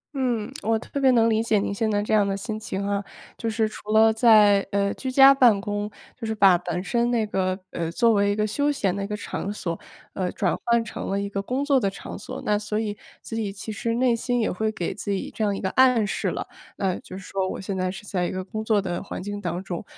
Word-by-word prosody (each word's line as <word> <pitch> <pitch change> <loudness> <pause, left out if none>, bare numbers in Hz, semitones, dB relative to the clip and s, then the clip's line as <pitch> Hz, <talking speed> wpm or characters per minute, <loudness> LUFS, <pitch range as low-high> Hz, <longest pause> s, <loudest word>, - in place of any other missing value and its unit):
嗯， 245 -3 -1
我 225 +2 +1
特 280 +5 -5
别 265 - +5
能 230 -2 +5
理 220 -1 +2
解 225 -2 +2
您 200 - -1
现 220 +2 0
在 205 0 +1
这 215 - -2
样 205 -2 +4
的 195 0 -1
心 215 +1 -5
情 200 -2 -4
哈。 200 0 -1 0.3
就 230 - -3
是 220 0 +1
除 215 0 -11
了 220 0 +6
在， 215 -3 +6
呃， 200 0 +1
居 260 - -5
家 270 +1 +8
办 240 -7 +5
公， 205 0 -3 0.3
就 230 -3 -6
是 220 - -2
把 195 -3 +6
本 180 0 -3
身 235 +2 +1
那 230 -3 +1
个， 185 -2 -1
呃， 165 -1 -3
作 230 +5 +3
为 200 0 +3
一 - - 0
个 215 0 +1
休 285 +7 0
闲 195 -9 0
的 200 - -3
一 - - -3
个 210 0 -4
场 200 -1 -4
所， 170 -5 -4 0.3
呃， 185 -2 -2
转 - - 0
换 235 -1 +2
成 - - -6
了 195 - 0
一 200 - -2
个 200 0 -3
工 260 +7 -2
作 280 -3 +4
的 200 - +1
场 195 - -8
所， - - -7
那 210 0 +2
所 210 0 -2
以 210 -2 -2 0.3
自 225 - -6
己 215 -3 -2
其 210 +2 -7
实 230 +2 -2
内 245 -1 +3
心 245 +1 -1
也 220 - +1
会 220 +4 -1
给 175 -5 -3
自 210 - -7
己 195 -1 -2
这 220 - -1
样 200 -1 +1
一 - - -5
个 190 - -2
暗 250 -4 +4
示 - - -2
了， - - -3 0.3
那 190 -3 0
就 185 - -10
是 195 - -9
说 190 -1 -2
我 - - -5
现 195 0 -4
在 185 -1 -1
是 195 +3 -8
在 180 -3 -1
一 - - -4
个 185 0 -4
工 215 +3 -5
作 220 -2 +2
的 180 -3 -3
环 - - -6
境 205 0 -5
当 175 0 -3
中。 175 -3 -5
210 Hz, 290 characters per minute, -24 LUFS, 195-225 Hz, 0.3 s, 家